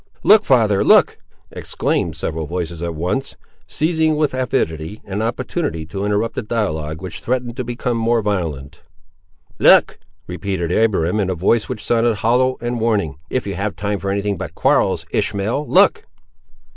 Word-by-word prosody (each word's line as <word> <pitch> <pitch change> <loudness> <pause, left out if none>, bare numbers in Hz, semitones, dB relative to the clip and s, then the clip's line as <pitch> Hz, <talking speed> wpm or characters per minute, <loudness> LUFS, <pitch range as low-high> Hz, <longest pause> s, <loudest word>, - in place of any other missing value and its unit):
"Look! 215 +1 +6
father, 110 -6 +3
look!" - - +4 0.3
exclaimed - - -2
several 80 -1 -4
voices 85 -1 -4
at 85 -1 -3
once, 90 - -2 0.3
seizing 160 0 +1
with 150 -3 0
avidity, 105 -8 -2
an 100 +1 -3
opportunity 120 - -2
to 95 +5 -5
interrupt 105 +2 0
a - - -2
dialogue 80 -8 -3
which 95 - -6
threatened 125 -1 -2
to 130 - -2
become 120 0 -2
more 115 0 +1
violent. 80 -9 -3 0.8
"Look!" - - +5 0.3
repeated 90 -1 -3
Abiram, 105 -2 +1
in 95 -2 0
a 95 - -1
voice 105 +6 +1
which 125 -4 -5
sounded 115 -1 +2
hollow 125 +5 +1
and 120 0 -2
warning; 100 - 0
"if 130 - -2
you 100 - -3
have 100 +2 -3
time 100 +2 -2
for 100 - -3
any 100 +1 -1
thing 100 -2 -1
but - - -7
quarrels, - - +2
Ishmael, 110 +8 -1
look!" 205 - +4
105 Hz, 160 wpm, -19 LUFS, 90-120 Hz, 0.8 s, Look